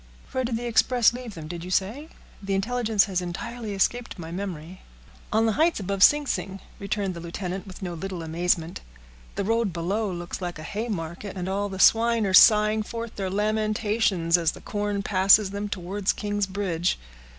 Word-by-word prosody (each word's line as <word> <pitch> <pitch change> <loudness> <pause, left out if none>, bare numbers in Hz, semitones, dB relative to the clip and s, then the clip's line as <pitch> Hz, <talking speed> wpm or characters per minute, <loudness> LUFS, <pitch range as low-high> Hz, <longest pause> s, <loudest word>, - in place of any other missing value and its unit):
"Where 260 - -1
did 235 -2 -1
the 240 - -5
express 240 0 +3
leave 245 -4 -7
them, 160 -2 -8
did 170 +1 -6
you 180 - -7
say? 215 - -1 0.3
The 195 -1 -1
intelligence 220 0 +2
has 185 -3 -1
entirely 215 +5 -5
escaped 235 +5 0
my 165 -2 -7
memory." 180 -2 -6 0.5
"On 220 +1 +3
the 225 - +3
heights 320 +6 +2
above 195 0 -3
Sing 295 +7 +6
Sing," 195 -4 -3 0.2
returned 200 -1 -2
the 170 - -7
lieutenant, 180 +3 -5
with 190 +1 -10
no 175 -2 -3
little 180 0 -5
amazement. 165 +1 -1 0.5
"The - - -1
road 225 0 +1
below 190 +5 -2
looks 175 +1 -6
like 175 -2 -4
a 155 - -8
hay 215 +8 -4
market, 190 0 -5
and 180 0 -3
all 200 +2 -1
the 190 - -6
swine 230 +2 +4
are 190 - -1
sighing 215 +2 +6
forth 230 +1 -6
their 195 -2 -3
lamentations, 210 -3 +1
as 165 -1 +1
the - - -12
corn 205 -2 -2
passes 195 +1 +5
them 205 +1 -4
towards 195 +1 -1
King's 205 -1 -2
Bridge. 185 -3 -1
200 Hz, 185 wpm, -25 LUFS, 180-220 Hz, 0.5 s, Sing